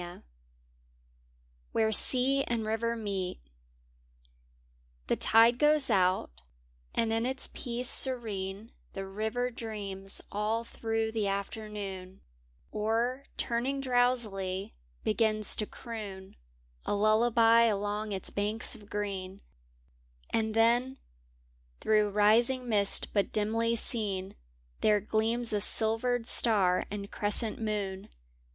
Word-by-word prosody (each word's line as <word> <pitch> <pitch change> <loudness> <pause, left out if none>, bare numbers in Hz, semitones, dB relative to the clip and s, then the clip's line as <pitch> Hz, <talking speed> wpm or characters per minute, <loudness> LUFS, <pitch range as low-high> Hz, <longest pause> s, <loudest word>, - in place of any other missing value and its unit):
Where 220 -1 +1
Sea 265 +5 +5
anb 235 -2 -1
IRiver 230 +2 -2
nDeet 195 -4 -4 1.7
HE - - +1
tide 230 +2 +4
goes 300 -3 +3
out, 185 - +1 0.6
and 225 -1 +1
in 225 0 0
its 265 +1 -1
peace 245 0 +1
serene 220 -6 +4 0.2
The 195 0 -5
river 220 +5 -3
dreams 200 -4 -6
all 215 +3 -1
through 225 -1 -3
the 220 -2 -1
afternoon, 200 -2 -6 0.5
Or, 230 +5 -1
turning 255 +4 -1
drowsily, 235 -7 0 0.3
begins 215 -1 +1
to 210 - -1
croon 205 -5 -9 0.5
A - - -2
lullaby 225 +2 +4
along 210 0 -2
its 190 -2 -2
banks 210 +2 -1
of 205 -1 -13
green; 195 -2 -5 0.9
And 220 -1 -1
then, 240 +4 +2 0.8
through 215 -1 +2
rising 230 +5 +2
mist 205 -3 +2
but 200 -2 0
dimly 225 +2 0
seen. 200 -5 -2 0.5
There 210 -1 +3
gleams 225 +3 -1
a 205 - 0
silvered 225 +3 0
star 195 -8 +2
and 200 0 -7
crescent 215 +2 -2
moon. 200 -3 -4
220 Hz, 105 wpm, -29 LUFS, 200-235 Hz, 1.7 s, Sea